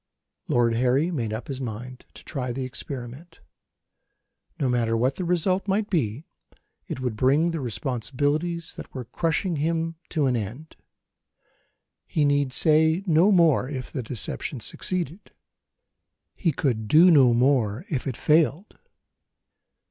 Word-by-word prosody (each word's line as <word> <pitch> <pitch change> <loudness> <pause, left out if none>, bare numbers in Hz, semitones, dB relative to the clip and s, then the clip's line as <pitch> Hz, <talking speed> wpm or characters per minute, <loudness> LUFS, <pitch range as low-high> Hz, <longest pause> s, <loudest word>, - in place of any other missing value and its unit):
Lord 120 -1 +2
Harry 130 +8 +2
made 120 -10 -2
up 110 +2 -5
his 135 -1 -5
mind, 125 +2 -7
to - - -11
try 130 -5 -4
the 130 +2 -3
experiment. 135 +4 -8 1.2
No 140 - +1
matter 115 -2 +1
what 130 +4 0
the 185 - -3
result 180 +3 +1
might 205 +2 0
be, 140 - -1 0.6
it - - -5
would 125 -4 -2
bring 140 +9 +3
the 165 - -3
responsibilities 145 +7 -2
that - - -9
were 125 -2 -5
crushing 165 - -1
him 165 +2 -1
to 155 -4 0
an 130 -2 +1
end. 120 +9 -6 1.3
He 150 - +1
need 145 -2 +2
say 160 +4 +3
no 175 +3 +4
more, 165 -8 +4
if 130 -3 -6
the 135 - -3
deception 120 +3 -4
succeeded. 175 - -4 1.0
He 170 - 0
could 120 -7 -1
do 170 - +7
no 135 -6 +6
more, 125 - +1
if 145 - -3
it 130 - -3
failed. 155 - +1
140 Hz, 140 wpm, -25 LUFS, 125-165 Hz, 1.3 s, do